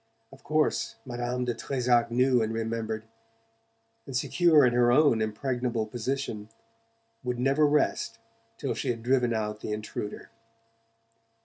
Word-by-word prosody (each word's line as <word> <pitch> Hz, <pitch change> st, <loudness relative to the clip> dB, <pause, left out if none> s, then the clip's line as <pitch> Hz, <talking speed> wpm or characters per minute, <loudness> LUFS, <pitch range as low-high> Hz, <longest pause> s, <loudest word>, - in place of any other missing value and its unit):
Of 135 Hz, -, -16 dB
course 155 Hz, 0 st, 0 dB
Madame 125 Hz, 0 st, -3 dB
de 120 Hz, -, 0 dB
Trezac 120 Hz, -1 st, +1 dB
knew 125 Hz, +1 st, +3 dB
and 110 Hz, 0 st, -1 dB
remembered, 115 Hz, -1 st, -3 dB, 1.0 s
and, 135 Hz, -2 st, -2 dB
secure 145 Hz, +2 st, +4 dB
in 120 Hz, -, +3 dB
her 120 Hz, 0 st, +4 dB
own 130 Hz, -4 st, +4 dB
impregnable 120 Hz, +1 st, -1 dB
position, 115 Hz, -2 st, -4 dB, 0.7 s
would 125 Hz, -1 st, -2 dB
never 135 Hz, +4 st, +3 dB
rest 145 Hz, -5 st, +1 dB, 0.4 s
till -, -, -2 dB
she -, -, -3 dB
had 115 Hz, -2 st, -2 dB
driven 125 Hz, -1 st, +2 dB
out 105 Hz, -1 st, -2 dB
the 110 Hz, -, -5 dB
intruder. 105 Hz, -1 st, -5 dB
120 Hz, 130 wpm, -28 LUFS, 115-135 Hz, 1.0 s, secure